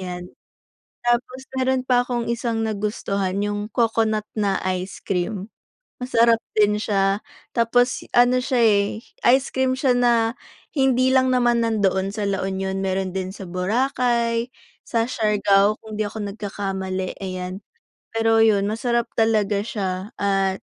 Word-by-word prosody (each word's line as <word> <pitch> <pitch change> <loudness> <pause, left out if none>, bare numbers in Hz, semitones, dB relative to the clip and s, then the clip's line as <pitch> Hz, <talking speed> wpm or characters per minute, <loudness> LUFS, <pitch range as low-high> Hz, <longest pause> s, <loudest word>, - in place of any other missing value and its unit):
'Yan. 180 -1 -6 0.8
Tapos 250 +2 0
meron 260 0 0
pa 250 -1 +3
akong 245 -1 -2
isang 235 -1 -1
nagustuhan 200 -2 -2
yung 205 +1 -3
coconut 220 -2 +1
na 200 -3 0
ice 185 0 -2
cream, 190 +1 -2 0.5
masarap 235 -2 +3 0.2
din 210 0 +3
siya. 195 -1 +1 0.3
Tapos 245 +1 +1
ano 245 +1 +5
siya 250 -1 +1
eh, 210 0 +2 0.3
ice 270 0 +1
cream 260 0 +1
siya 260 -2 +2
na 235 -1 +2 0.3
hindi 260 -2 +2
lang 260 -1 +3
naman 240 -2 +2
nandoon 195 -3 0
sa 210 - -3
La 195 - -1
Union 190 0 -2
meron 190 -1 -1
din 190 +1 -4
sa - - -9
Boracay, 235 +5 0 0.4
sa 230 - +1
Siargao 205 -2 +3
kung 215 -1 -8
hindi 215 - 0
ako 205 -1 -5
nagkakamali, 190 -2 -4
ayan. 185 -1 -5 0.5
Pero 225 0 +3
yun 200 -3 +3
masarap 235 +2 0
talaga 210 -3 +2
siya 195 -2 -4
at 195 -1 +1
215 Hz, 135 wpm, -22 LUFS, 195-240 Hz, 0.8 s, ano